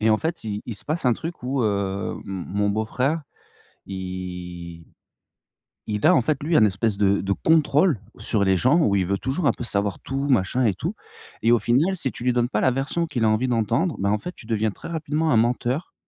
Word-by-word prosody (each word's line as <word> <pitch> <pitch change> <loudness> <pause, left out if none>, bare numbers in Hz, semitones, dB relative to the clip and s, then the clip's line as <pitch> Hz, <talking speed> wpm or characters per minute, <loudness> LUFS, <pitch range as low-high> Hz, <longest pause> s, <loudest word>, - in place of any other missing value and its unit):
Et 110 +1 +3
en 110 - +5
fait, 165 -3 -3
il 105 -1 -4
il 115 - -4
se 100 - -11
passe 155 0 -2
un 125 - +5
truc 165 +2 -6
où, 130 0 -1
heu, 100 -2 -1
mon 95 -3 -5
mon 105 0 +2
beau 110 +2 0
frère, 140 +8 -1 0.6
il 90 -3 -7 1.0
il 105 +5 0
a 180 - +7
en 130 - +4
fait 140 +3 -1
lui 160 +1 +2
un 110 - +6
espèce 105 +1 +1
de 100 -1 +3
de 100 +1 -1
contrôle 155 - +3 0.2
sur 105 -3 0
les 95 -1 +3
gens 130 - +3
où 100 -10 +3
il 95 -2 +1
veut 100 +1 0
toujours 135 +7 -2
un - - +5
peu - - -6
savoir 100 -3 -1
tout, 135 +2 -3
machin 125 +1 +2
et 105 -5 +2
tout - - -4 0.5
et 115 - +4
au 120 - +5
final, 145 - +2
si 135 -7 -3
tu - - -8
lui 125 - +3
donnes 120 0 +1
pas - - 0
la 130 - +4
version 135 +6 -1
qu'il 125 -7 -1
a - - +4
envie 110 +4 +1
d'entendre, 115 - +1
ben 100 +1 +1
en 105 - +2
fait, 180 - -6
tu - - -13
deviens 110 -1 0
très - - -10
rapidement 155 -1 -1
un - - +4
menteur 120 +6 0
115 Hz, 235 wpm, -24 LUFS, 100-140 Hz, 1.0 s, a